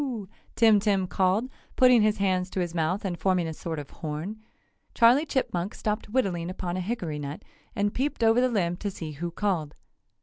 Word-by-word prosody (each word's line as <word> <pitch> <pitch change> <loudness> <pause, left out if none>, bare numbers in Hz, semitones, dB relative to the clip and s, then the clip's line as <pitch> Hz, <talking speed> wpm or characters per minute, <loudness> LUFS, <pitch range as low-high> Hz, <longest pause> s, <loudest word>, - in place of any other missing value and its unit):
Tim 220 -3 +6
Tim 200 -2 +1
called, 190 +6 +1 0.3
putting 250 -2 +6
his 215 0 +2
hands 185 -2 +1
to 190 - -3
his 175 -2 -2
mouth 175 +5 -1
and 175 -3 -3
forming 180 -1 +1
a 160 - -4
sort 165 0 -5
of 145 -2 -7
horn. 165 +7 -5 0.5
Charley 255 +6 +5
Chipmunk 195 -9 -1
stopped 210 0 -3
whittling 190 -8 0
upon 180 -1 -4
a - - -2
hickory 180 -7 -3
nut 145 +1 -6 0.3
and 205 -1 0
peeped 265 -2 -1
over 225 +2 +5
the 255 - +3
limb 175 -7 0
to 205 - -3
see 165 -5 -6
who 165 +4 -4
called. 170 -5 -2
190 Hz, 190 wpm, -27 LUFS, 170-220 Hz, 0.5 s, Tim